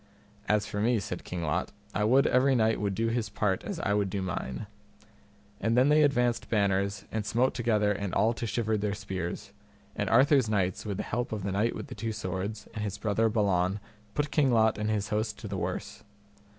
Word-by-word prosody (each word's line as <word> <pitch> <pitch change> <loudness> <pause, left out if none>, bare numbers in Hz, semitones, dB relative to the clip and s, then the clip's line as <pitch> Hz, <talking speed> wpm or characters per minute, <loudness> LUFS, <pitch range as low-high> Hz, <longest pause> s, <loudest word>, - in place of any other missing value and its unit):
As 105 -1 +3
for 105 - -3
me, 115 +1 +3
said 90 -2 -5
King 90 -2 -4
Lot, 75 -2 -1 0.2
I 105 - +1
would 130 +5 +5
every 130 +1 +4
knight 110 -2 +2
would 100 -2 -1
do 115 +2 0
his 115 -2 -1
part 95 -4 0
as 195 -5 -4
I 100 - 0
would 100 -2 +1
do 95 0 -2
mine. 85 -2 -4 0.9
And 115 +3 +1
then 130 +3 +5
they 150 +1 +5
advanced 125 -5 +2
banners 100 -2 +1
and 110 -1 -1
smote 120 +5 +1
together 110 -4 +1
and 100 -2 -2
all 110 +5 +2
to 115 0 -4
shivered 110 -2 0
their 100 -1 -1
spears; 95 -4 -5 0.4
and - - -1
Arthur's 130 0 +5
knights, 95 -1 0
with 100 -2 -2
the - - -2
help 120 +3 -2
of 105 -3 -3
the 100 - -2
Knight 105 +5 +1
with - - -5
the 135 - -8
Two 115 0 -3
Swords 100 +1 -4
and 110 -2 -4
his 105 -1 -3
brother 110 +2 +1
Balan 100 -3 +1 0.4
put 145 0 0
King 145 -4 +3
Lot 110 -3 +3
and 105 0 -1
his 105 -1 -1
host 110 0 -1
to 105 - -7
the 100 - -4
worse. 95 +3 -4
105 Hz, 215 wpm, -29 LUFS, 100-115 Hz, 0.9 s, would